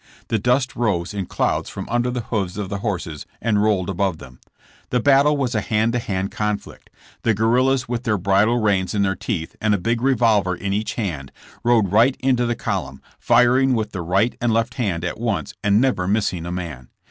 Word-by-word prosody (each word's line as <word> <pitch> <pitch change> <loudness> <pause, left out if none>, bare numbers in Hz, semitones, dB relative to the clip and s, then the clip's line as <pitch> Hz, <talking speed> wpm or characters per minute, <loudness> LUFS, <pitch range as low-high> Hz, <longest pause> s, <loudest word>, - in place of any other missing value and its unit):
The 110 - +1
dust 125 +4 +1
rose 100 -6 -1
in 100 -3 -3
clouds - - -1
from - - -7
under 120 +2 0
the 125 0 -2
hoofs 100 -5 -3
of 100 -3 -4
the 100 -1 -3
horses 90 -8 -4
and 105 -3 +1
rolled 100 -4 +1
above 95 -2 -1
them. 65 -4 -13 0.5
The 125 - +1
battle 140 +3 +4
was 130 -3 -1
a 110 - +1
hand 110 +3 0
to 120 - +1
hand 95 -3 -3
conflict. 105 -1 -4 0.3
The 115 -2 +2
guerrillas 125 +4 +2
with 120 -1 -2
their 110 -4 0
bridle 100 +5 +2
reins 100 -3 +1
in 100 - +2
their 95 -1 +1
teeth 85 -8 -4
and 105 -1 +3
a - - 0
big 115 +5 -1
revolver 115 -8 +2
in 95 +2 -3
each 105 +2 -2
hand, 80 - -4 0.3
rode 115 -6 +3
right 120 +6 +4
into 125 -2 +1
the 120 - 0
Cvolumn, 95 - -3 0.2
firing 125 +2 +4
with 110 -2 -2
the 95 - -4
right 95 +8 +1
and 120 -1 +2
left 115 +1 0
hand 95 -8 -2
at 90 - -4
once 100 -10 -2
and 100 0 +4
never 120 -8 +1
missing 95 -5 0
a - - -4
man. 80 -9 -6
105 Hz, 205 wpm, -21 LUFS, 95-120 Hz, 0.5 s, battle